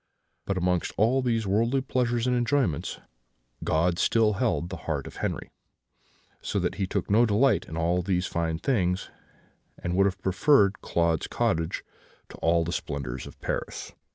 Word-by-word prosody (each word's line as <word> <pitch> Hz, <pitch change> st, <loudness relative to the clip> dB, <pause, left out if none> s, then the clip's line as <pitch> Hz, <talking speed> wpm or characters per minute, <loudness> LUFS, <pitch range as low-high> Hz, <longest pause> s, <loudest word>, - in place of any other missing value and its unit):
But, 100 Hz, -, 0 dB
amongst 90 Hz, -1 st, 0 dB
all 120 Hz, +5 st, +3 dB
these 115 Hz, -3 st, 0 dB
worldly 115 Hz, +7 st, +2 dB
pleasures 120 Hz, -2 st, 0 dB
and 125 Hz, -1 st, +2 dB
enjoyments, 120 Hz, -, 0 dB, 0.6 s
God 85 Hz, +2 st, +1 dB
still 110 Hz, -2 st, +3 dB
held 100 Hz, -5 st, 0 dB
the 95 Hz, -, -5 dB
heart -, -, -1 dB
of -, -, -10 dB
Henri; -, -, -3 dB, 0.9 s
so -, -, -2 dB
that -, -, 0 dB
he 95 Hz, -, +1 dB
took 100 Hz, 0 st, -2 dB
no 110 Hz, +3 st, +6 dB
delight 110 Hz, +6 st, +3 dB
in 80 Hz, -, -6 dB
all 85 Hz, +2 st, +1 dB
these 90 Hz, 0 st, 0 dB
fine 80 Hz, -2 st, -1 dB
things, 90 Hz, -4 st, 0 dB, 0.7 s
and 85 Hz, 0 st, -3 dB
would 95 Hz, +1 st, +4 dB
have 95 Hz, -1 st, -2 dB
preferred 100 Hz, +3 st, +3 dB
Claude's 85 Hz, -2 st, 0 dB
cottage 80 Hz, 0 st, -1 dB, 0.5 s
to -, -, -11 dB
all 85 Hz, 0 st, +2 dB
the 85 Hz, -, -3 dB
splendours 65 Hz, -5 st, -4 dB
of -, -, -13 dB
Paris. -, -, -4 dB
95 Hz, 160 wpm, -27 LUFS, 85-115 Hz, 0.9 s, no